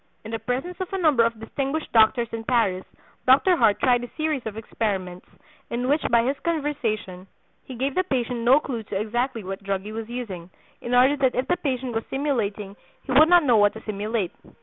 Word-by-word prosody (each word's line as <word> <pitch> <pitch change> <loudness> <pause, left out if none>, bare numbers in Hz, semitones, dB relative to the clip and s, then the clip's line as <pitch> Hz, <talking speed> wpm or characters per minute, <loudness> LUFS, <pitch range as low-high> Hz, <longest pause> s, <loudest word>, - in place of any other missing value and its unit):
In 220 - -7
the 225 - -3
presence 255 - -3
of 375 - -2
a - - 0
number 300 -9 +4
of 230 -1 -1
distinguished 275 +6 -3
doctors 230 +1 +4
in 225 0 -5
Paris, 220 -6 +1 0.4
Dr. 280 +8 +5
Hart 225 -9 +3
tried 245 -2 +3
a 245 - -7
series 310 -3 -1
of 215 -1 -6
experiments 190 -5 -3 0.4
in 245 +2 -2
which 290 +3 +2
by 235 -1 +4
his 275 +2 -1
conversation 240 - -2 0.4
he 260 - -8
gave 265 +3 -1
the 370 - +1
patient 250 -7 -2
no 245 +5 +5
clue 255 -6 -5
to 205 -2 -4
exactly 235 +2 -2
what 195 +1 -6
drug 195 -1 -2
he 210 - -7
was 225 +1 -6
using, 200 -8 -6 0.3
in 240 +1 -1
order 260 +3 +5
that 265 -3 +1
if 255 +1 -1
the 355 - +1
patient 260 -5 -3
was 225 0 -2
simulating 215 -8 -2 0.3
he 270 - -6
would 305 +5 +6
not 350 -1 +6
know 245 -5 +4
what 205 -1 +4
to 220 - -9
simulate. 210 -2 -2
240 Hz, 210 wpm, -24 LUFS, 215-275 Hz, 0.4 s, would